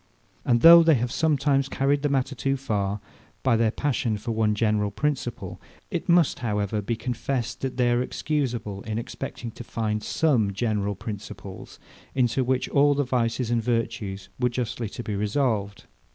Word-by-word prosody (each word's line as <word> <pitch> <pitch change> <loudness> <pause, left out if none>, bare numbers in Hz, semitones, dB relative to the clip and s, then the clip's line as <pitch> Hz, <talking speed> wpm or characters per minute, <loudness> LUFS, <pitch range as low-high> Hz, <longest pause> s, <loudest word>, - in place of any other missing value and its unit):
And 120 -1 +2
though 170 +1 +10
they 160 -2 +5
have 120 0 -1
sometimes 140 -3 +1
carried 140 +1 +1
the 145 - +1
matter 135 0 0
too 135 +1 -1
far, 105 -6 -2 0.4
by 130 -3 +3
their 115 0 +3
passion 120 -3 -1
for 110 +3 -4
some - - -3
one 110 -1 +2
general 105 -1 +1
principle; 125 +2 -3 0.3
it - - -3
must, 170 -3 +4
however, 105 -2 -1
be 115 +4 -2
confessed, 125 +1 -3
that 130 -1 -3
they 125 -1 +3
are 120 0 +2
excusable 120 -8 -2
in 110 +1 -4
expecting 115 0 -6
to 120 - -9
find 110 -2 -2
some 115 -8 +1
general 105 -1 -1
principles, 100 -2 -8 0.4
into 130 0 +2
which 130 +1 0
all 145 0 +4
the 145 - +1
vices 120 -1 -1
and 120 -1 +2
virtues 105 -5 -2
were 125 0 +2
justly 120 -2 -3
to 120 - -7
be 105 - -3
resolved. 105 -1 -1
120 Hz, 170 wpm, -25 LUFS, 105-135 Hz, 0.4 s, though